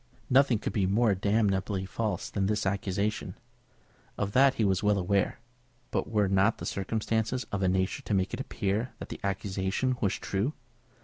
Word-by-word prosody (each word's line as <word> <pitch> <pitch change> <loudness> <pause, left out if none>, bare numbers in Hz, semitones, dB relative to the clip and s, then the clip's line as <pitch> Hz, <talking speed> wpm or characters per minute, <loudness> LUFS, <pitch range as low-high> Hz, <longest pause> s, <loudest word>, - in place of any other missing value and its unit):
Nothing 130 -2 +5
could - - -4
be 95 -3 +1
more 105 +2 +3
damnably 100 -1 +1
false 105 +3 -3
than 95 -2 0
this 105 +1 0
accusation. 100 +2 -1 0.8
Of 100 0 -1
that 135 +3 +5
he 110 - +1
was 95 -1 +2
well 105 -1 +3
aware. 95 +1 +1 0.5
But - - -1
were 105 -2 +2
not 95 +3 +3
the - - -6
circumstances 110 +4 -1
of 100 - -2
a 95 - +2
nature 95 +1 0
to 105 - -1
make 95 0 0
it - - -3
appear 110 -1 -2
that - - -8
the - - -6
accusation 100 +5 -1
was 100 -4 +1
true? 100 +10 -2
100 Hz, 175 wpm, -29 LUFS, 95-110 Hz, 0.8 s, Nothing